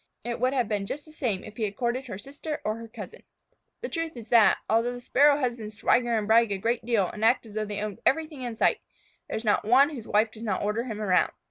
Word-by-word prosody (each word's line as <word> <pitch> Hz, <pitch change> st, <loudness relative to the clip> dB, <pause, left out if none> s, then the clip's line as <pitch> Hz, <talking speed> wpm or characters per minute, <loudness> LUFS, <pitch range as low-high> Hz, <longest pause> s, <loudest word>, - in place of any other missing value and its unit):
It 235 Hz, 0 st, -4 dB
would 255 Hz, +2 st, +1 dB
have 250 Hz, -5 st, +1 dB
been 205 Hz, -2 st, -2 dB
just 290 Hz, +7 st, -5 dB
the 310 Hz, -, -15 dB
same 235 Hz, -11 st, -2 dB
if 210 Hz, -, -11 dB
he 230 Hz, -, -2 dB
had 205 Hz, -1 st, -5 dB
courted 250 Hz, +3 st, -2 dB
her 190 Hz, -, -6 dB
sister 285 Hz, +7 st, -6 dB
or 215 Hz, +1 st, -1 dB
her 230 Hz, 0 st, -9 dB
cousin. 220 Hz, -, -10 dB, 0.6 s
The -, -, -3 dB
truth 330 Hz, -4 st, -4 dB
is 225 Hz, -2 st, -10 dB
that, 230 Hz, -3 st, +6 dB
although 230 Hz, +2 st, +2 dB
the 245 Hz, -, -7 dB
Sparrow 285 Hz, +4 st, +4 dB
husbands 235 Hz, -6 st, -3 dB
swagger 240 Hz, 0 st, +2 dB
and 215 Hz, -, -1 dB
brag 225 Hz, 0 st, +4 dB
a 200 Hz, -, 0 dB
great 230 Hz, +5 st, -1 dB
deal 225 Hz, -5 st, +1 dB
and 210 Hz, -, -7 dB
act 235 Hz, +2 st, +3 dB
as 215 Hz, -, -12 dB
though 215 Hz, 0 st, -2 dB
they 205 Hz, 0 st, -4 dB
owned 210 Hz, -2 st, -4 dB
everything 310 Hz, -1 st, 0 dB
in 240 Hz, -2 st, -4 dB
sight, -, -, +2 dB, 0.5 s
there -, -, -3 dB
is 220 Hz, -, -6 dB
not 210 Hz, -, +2 dB
one 260 Hz, +7 st, +5 dB
whose 245 Hz, -7 st, -8 dB
wife 215 Hz, +2 st, +2 dB
does 220 Hz, -, -13 dB
not 205 Hz, -5 st, -2 dB
order 210 Hz, +4 st, -1 dB
him 220 Hz, -4 st, -5 dB
around. 190 Hz, -4 st, +2 dB
230 Hz, 260 wpm, -27 LUFS, 215-255 Hz, 0.6 s, that